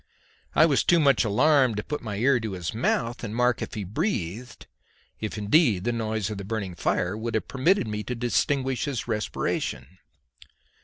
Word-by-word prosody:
I 155 Hz, -, +7 dB
was 145 Hz, -5 st, +2 dB
too 170 Hz, -, +4 dB
much 140 Hz, -9 st, +4 dB
alarmed 130 Hz, +2 st, +3 dB
to 105 Hz, -, -2 dB
put 150 Hz, -, -4 dB
my 110 Hz, -3 st, -5 dB
ear 125 Hz, +5 st, +3 dB
to 110 Hz, -3 st, -4 dB
his 90 Hz, -3 st, -4 dB
mouth 115 Hz, +1 st, 0 dB
to 115 Hz, -, -6 dB
mark 125 Hz, +3 st, +1 dB
if -, -, -5 dB
he 105 Hz, -, -3 dB
breathed, 115 Hz, -, -3 dB, 0.5 s
if 110 Hz, 0 st, -4 dB
indeed 105 Hz, -, +3 dB
the 120 Hz, -, 0 dB
noise 110 Hz, -3 st, -2 dB
of 105 Hz, -, -5 dB
the -, -, -5 dB
burning 100 Hz, -3 st, -4 dB
fire 90 Hz, +2 st, -1 dB
would 115 Hz, +1 st, -4 dB
have 110 Hz, -, -1 dB
permitted 150 Hz, -, +2 dB
me 105 Hz, 0 st, -3 dB
to 125 Hz, -, -3 dB
distinguish 130 Hz, +2 st, 0 dB
his 140 Hz, -6 st, -3 dB
respiration. 95 Hz, -, -3 dB
115 Hz, 185 wpm, -26 LUFS, 105-130 Hz, 0.5 s, I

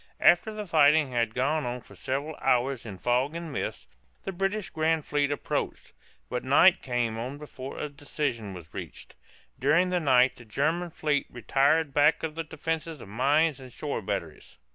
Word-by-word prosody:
After 175 Hz, +7 st, +5 dB
the 215 Hz, -1 st, -5 dB
fighting 155 Hz, -4 st, +4 dB
had 115 Hz, -2 st, 0 dB
gone 145 Hz, +5 st, +1 dB
on 125 Hz, 0 st, -3 dB
for -, -, -17 dB
several 140 Hz, +4 st, -3 dB
hours 130 Hz, -1 st, +1 dB
in 100 Hz, -3 st, -7 dB
fog 125 Hz, -, +1 dB
and 170 Hz, -3 st, -5 dB
mist, -, -, -5 dB, 0.3 s
the 195 Hz, -, -3 dB
British 195 Hz, +2 st, -2 dB
grand 160 Hz, -1 st, +1 dB
fleet 145 Hz, -1 st, +1 dB
approached, 145 Hz, -, -3 dB, 0.3 s
but 125 Hz, -, -3 dB
night 170 Hz, +8 st, +5 dB
came 120 Hz, -3 st, -1 dB
on 130 Hz, +5 st, -5 dB
before 140 Hz, -2 st, -8 dB
a -, -, -3 dB
decision 140 Hz, -8 st, -4 dB
was 80 Hz, -3 st, -12 dB
reached. -, -, -8 dB, 0.5 s
During 165 Hz, +8 st, +3 dB
the 180 Hz, 0 st, +1 dB
night 130 Hz, -4 st, +4 dB
the 120 Hz, -, -12 dB
German 155 Hz, +10 st, 0 dB
fleet 150 Hz, -3 st, -1 dB
retired 140 Hz, +5 st, +2 dB
back 150 Hz, +3 st, +4 dB
of 160 Hz, -1 st, -2 dB
the 165 Hz, +1 st, -3 dB
defenses 160 Hz, 0 st, -4 dB
of 100 Hz, -, -11 dB
mines 140 Hz, +6 st, +2 dB
and 130 Hz, -1 st, -11 dB
shore 145 Hz, -3 st, -4 dB
batteries. 90 Hz, -10 st, -5 dB
145 Hz, 175 wpm, -28 LUFS, 125-160 Hz, 0.5 s, After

